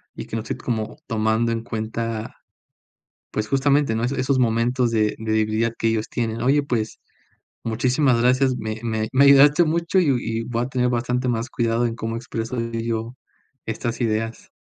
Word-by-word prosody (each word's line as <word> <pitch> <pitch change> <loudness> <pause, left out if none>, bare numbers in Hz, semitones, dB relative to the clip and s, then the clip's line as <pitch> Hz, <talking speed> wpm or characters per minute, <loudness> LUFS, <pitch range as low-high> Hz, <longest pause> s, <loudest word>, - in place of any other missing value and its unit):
y - - -6
que - - -6
no 115 - -1
estoy 110 - -5
como 110 0 -3
tomando 110 0 +1
en 115 -1 -1
cuenta, 115 0 -4 0.9
pues, 110 - -2
justamente, 140 0 +2
¿no? 110 +1 -1
Eso 130 +3 -1
esos 130 +1 +1
momentos 120 +1 +2
de 110 -2 +1
de 110 0 -3
debilidad 110 +1 +1
que 115 - +1
ellos 110 -1 -1
tienen. 115 -1 -2
Oye, 140 +4 +3
pues, 115 -5 -2 0.6
muchísimas 125 +3 +2
gracias, 130 +1 +3
me 110 -1 -4
me 110 -2 -1
me 140 +2 +5
ayudaste 145 +4 +7
mucho, 170 +3 +1
y 175 - +2
y 115 -1 -3
voy 120 0 -2
a - - -5
tener 125 -1 +1
bastante 125 +1 -1
más 115 0 -1
cuidado 115 0 0
en 115 -1 -1
cómo 115 0 -4
expreso 115 +1 -4
yo 115 0 -3 0.5
estas 115 +2 -3
ideas. 115 -1 -2
115 Hz, 175 wpm, -22 LUFS, 110-125 Hz, 0.9 s, ayudaste